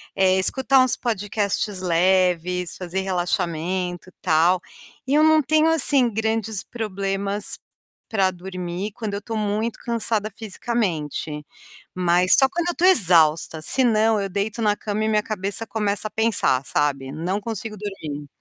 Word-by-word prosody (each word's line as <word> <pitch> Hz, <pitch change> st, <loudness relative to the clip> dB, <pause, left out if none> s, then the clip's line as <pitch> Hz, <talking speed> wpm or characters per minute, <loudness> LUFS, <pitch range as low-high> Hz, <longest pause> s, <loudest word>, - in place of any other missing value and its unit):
eh, 190 Hz, -1 st, +3 dB
escutar 265 Hz, +6 st, +3 dB
uns 255 Hz, -2 st, +1 dB
podcasts 205 Hz, -3 st, -2 dB
leves, 180 Hz, 0 st, +1 dB
fazer 185 Hz, +1 st, -3 dB
relaxamento 180 Hz, -1 st, -2 dB
e -, -, -23 dB
tal, 170 Hz, +2 st, +3 dB, 0.5 s
e 270 Hz, -, 0 dB
eu 305 Hz, -, +5 dB
não 315 Hz, 0 st, +5 dB
tenho, 310 Hz, +3 st, +3 dB
assim, 280 Hz, -5 st, +3 dB
grandes 220 Hz, -1 st, -1 dB
problemas 200 Hz, -2 st, -3 dB, 0.5 s
pra 195 Hz, -4 st, +2 dB
dormir 180 Hz, +1 st, -5 dB
quando 220 Hz, -3 st, -4 dB
eu 200 Hz, -, -5 dB
tô 225 Hz, +2 st, -6 dB
muito 215 Hz, +2 st, -2 dB
cansada 225 Hz, -2 st, -1 dB
fisicamente. 185 Hz, -, -3 dB, 0.5 s
Mas 180 Hz, +1 st, +4 dB
só 270 Hz, -, +6 dB
quando 345 Hz, +3 st, -2 dB
eu 350 Hz, -, -3 dB
tô 355 Hz, -, +1 dB
exausta, 165 Hz, -, +4 dB
senão 225 Hz, -, +2 dB
eu 195 Hz, -, -3 dB
deito 205 Hz, +4 st, -3 dB
na 210 Hz, -2 st, +2 dB
cama 210 Hz, 0 st, -3 dB
e -, -, 0 dB
minha 210 Hz, -1 st, +2 dB
cabeça 205 Hz, +1 st, -1 dB
começa 210 Hz, 0 st, -1 dB
a -, -, -12 dB
pensar, 220 Hz, -, +1 dB
sabe, 140 Hz, -2 st, -1 dB
não 180 Hz, +6 st, -2 dB
consigo 220 Hz, 0 st, -5 dB
dormir. 155 Hz, -8 st, -6 dB
200 Hz, 145 wpm, -22 LUFS, 180-225 Hz, 0.5 s, só